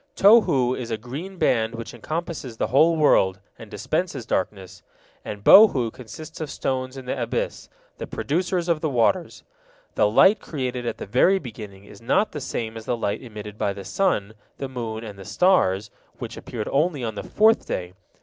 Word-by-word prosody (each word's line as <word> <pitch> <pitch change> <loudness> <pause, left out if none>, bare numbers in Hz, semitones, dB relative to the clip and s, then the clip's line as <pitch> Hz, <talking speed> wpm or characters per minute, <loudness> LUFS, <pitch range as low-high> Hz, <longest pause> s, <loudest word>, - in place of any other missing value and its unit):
Tohu 140 - +5
is 120 -2 -6
a 110 - -2
green 145 - -8
band 115 -6 +1
which 115 0 -7
encompasses 155 -7 -5
the - - 0
whole 165 +5 +5
world, 95 -11 +3 0.2
and 115 - -11
dispenses 155 - -3
darkness, 95 -3 -3 0.4
and 105 -1 -7
Bohu 135 - +7
consists 155 +7 -10
of 155 - -4
stones 130 -1 -3
in 130 - -8
the 125 - -3
abyss, - - -3 0.3
the - - -5
producers 175 +3 -1
of 165 -3 +1
the 155 - 0
waters. 120 -4 0 0.5
The 105 - +3
light 195 - +5
created 125 -5 -4
at - - -3
the - - -6
very 130 - +3
beginning 105 - -9
is 100 +1 -15
not 205 - +1
the 150 - -6
same 115 -4 -4
as 110 - -9
the 120 - -1
light 100 -3 -2
emitted 105 -3 -9
by 100 - 0
the 100 -1 -9
sun, 110 - 0 0.2
the 135 - -4
moon, 115 -4 -5
and 105 -3 -9
the - - -8
stars, 105 - +2 0.3
which - - -7
appeared 110 -3 -6
only 145 -1 +1
on 110 -2 -2
the 100 - -5
fourth 220 - +3
day. 90 0 -4
125 Hz, 185 wpm, -23 LUFS, 110-160 Hz, 0.5 s, Bohu